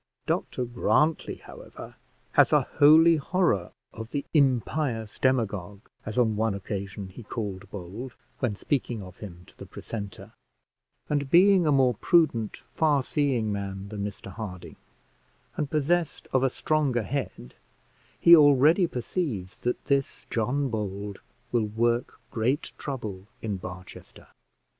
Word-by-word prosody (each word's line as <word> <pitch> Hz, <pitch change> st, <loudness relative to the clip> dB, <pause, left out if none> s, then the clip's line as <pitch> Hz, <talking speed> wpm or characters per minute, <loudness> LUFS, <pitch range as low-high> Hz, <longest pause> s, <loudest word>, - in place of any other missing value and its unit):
Dr 125 Hz, -, -1 dB
Grantly, 150 Hz, +6 st, +1 dB
however, -, -, -12 dB, 0.4 s
has -, -, +5 dB
a -, -, +4 dB, 0.2 s
holy 160 Hz, +3 st, +7 dB
horror 150 Hz, -, 0 dB, 0.2 s
of 110 Hz, 0 st, -8 dB
the 140 Hz, +2 st, -3 dB
impious 130 Hz, -, +1 dB
demagogue, 105 Hz, -6 st, -1 dB, 0.2 s
as 110 Hz, -, -5 dB
on 115 Hz, -3 st, +3 dB
one 110 Hz, -1 st, 0 dB
occasion 100 Hz, 0 st, -5 dB
he 95 Hz, -, -11 dB
called 100 Hz, -3 st, -5 dB
Bold, 105 Hz, +7 st, -7 dB, 0.3 s
when 115 Hz, -5 st, -1 dB
speaking 120 Hz, -3 st, -2 dB
of 90 Hz, 0 st, -12 dB
him 90 Hz, -4 st, -10 dB
to -, -, -20 dB
the -, -, -9 dB
precentor; 100 Hz, -4 st, -7 dB, 0.8 s
and 145 Hz, -2 st, -1 dB
being 185 Hz, +1 st, +6 dB
a -, -, +4 dB
more 130 Hz, -3 st, +4 dB
prudent 120 Hz, -, +1 dB
far 150 Hz, -4 st, +2 dB
seeing 130 Hz, -7 st, 0 dB
man 100 Hz, -1 st, -5 dB
than 105 Hz, -1 st, -4 dB
Mr 100 Hz, -1 st, -6 dB
Harding, 95 Hz, -4 st, -8 dB, 0.8 s
and 150 Hz, -2 st, -2 dB
possessed 160 Hz, +3 st, 0 dB
of 130 Hz, -, +4 dB
a 135 Hz, -, +3 dB
stronger 140 Hz, -4 st, 0 dB
head, 125 Hz, -, -5 dB, 0.7 s
he 170 Hz, -, +9 dB
already 150 Hz, +4 st, +5 dB
perceives 120 Hz, -, -3 dB
that 125 Hz, -, -3 dB
this 140 Hz, -1 st, -1 dB
John 130 Hz, +5 st, 0 dB
Bold 100 Hz, -2 st, -4 dB, 0.3 s
will 115 Hz, -3 st, +1 dB
work 120 Hz, +3 st, 0 dB
great 125 Hz, +7 st, -1 dB
trouble 105 Hz, -9 st, -5 dB, 0.2 s
in 105 Hz, -3 st, -2 dB
Barchester. 90 Hz, 0 st, -11 dB
120 Hz, 135 wpm, -27 LUFS, 100-145 Hz, 0.8 s, he